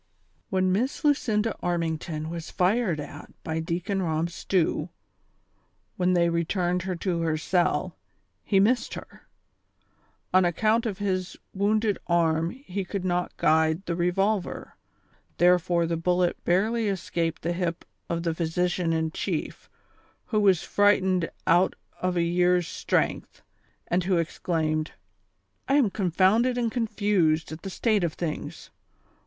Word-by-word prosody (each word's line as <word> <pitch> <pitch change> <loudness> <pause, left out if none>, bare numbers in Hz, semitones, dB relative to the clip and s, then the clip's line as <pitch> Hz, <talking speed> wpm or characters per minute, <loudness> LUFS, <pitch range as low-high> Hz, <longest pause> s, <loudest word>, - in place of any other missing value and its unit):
jtHEX 190 -1 +2
Miss 200 +9 0
Lucinda 225 -7 +2
Armington 160 -2 -2
was 170 -1 -6
fired 185 -2 +1
at 145 0 -8
by 160 0 -2
Deacon 175 +4 -2
Rob 165 -1 -1
Stew, 170 -2 0 1.1
when 180 0 +1
they 170 -1 +3
returned 175 +2 0
her 185 0 -3
to 170 -1 -2
her 160 -1 0
cell, 175 +3 0 0.5
he 195 - +2
missed 235 +6 +2
her; - - -12 1.1
on 185 0 +6
account 215 +7 +2
of 200 -4 -3
his 185 -2 -2 0.2
wounded 210 +1 +1
arm 165 -1 +2
he 200 -5 -5
could 185 0 -4
not 180 -1 -1
guide 160 +3 +2
the 170 - -2
revolver, 190 +3 -1 0.6
therefore 175 0 +3
the 165 0 -1
bullet 180 +1 0
barely 215 +6 +1
escaped 170 -4 -2
the 170 - 0
hip 170 -1 -3 0.2
of 170 0 -2
the 165 -1 0
physi 170 +2 0
cian 170 -3 0
in 160 0 0
chief, - - -4 0.6
who 215 - 0
was 190 -5 +4
frightened 190 -4 +2 0.2
out 175 +3 +3 0.3
of 180 -1 0
a 170 - +3
year's 175 0 +2
strength, - - -2 0.4
and 175 0 0
who 185 -1 +2
exclaimed: 160 -1 -1 0.4
" - - -47
I 275 - +4
am 255 -9 +3
confomided 200 +7 +2
and 235 -2 0
confused 205 -10 +1
at 155 - -7
the 195 - -6
state 210 0 +1
of 165 -3 0
things. 160 -3 -5
180 Hz, 140 wpm, -26 LUFS, 170-200 Hz, 1.1 s, on